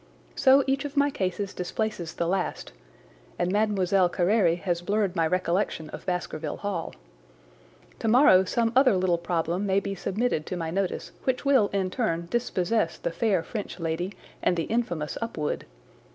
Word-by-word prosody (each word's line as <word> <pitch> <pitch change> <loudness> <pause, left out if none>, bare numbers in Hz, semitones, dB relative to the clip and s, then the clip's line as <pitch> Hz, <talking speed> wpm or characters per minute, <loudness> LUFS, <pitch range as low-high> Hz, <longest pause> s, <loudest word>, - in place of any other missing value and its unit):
So 270 +1 +5
each 270 +1 0
of 290 0 -6
my 285 0 +4
cases 190 -2 -2
displaces 180 -2 -3
the 170 - -1
last, 185 +2 -2 0.7
and 180 - 0
Mlle. 195 -3 +2
Carére 175 -1 +2
has 175 -3 -1
blurred 200 0 0
my 165 -2 +2
recollection 175 -2 -1
of - - -9
Baskerville 175 -4 -3
Hall. 195 -5 -4 1.0
Tomorrow 225 -5 +5
some 230 +4 +1
other 255 -6 +5
little 180 -2 +1
problem 170 +3 -1
may 195 0 +3
be 200 0 -4
submitted 195 -3 -1
to 180 - -3
my 165 -2 -3
notice 190 +1 -2
which 260 +1 0
will 265 -7 +5
in 190 -2 -1
turn 170 -7 -1
dispossess 220 -5 0
the - - -3
fair 190 -2 +1
French 205 +1 -6
lady 165 +4 -2 0.3
and 175 - +2
the 165 - 0
infamous 175 -11 -2
Upwood. 160 -10 -3
190 Hz, 155 wpm, -26 LUFS, 175-220 Hz, 1.0 s, So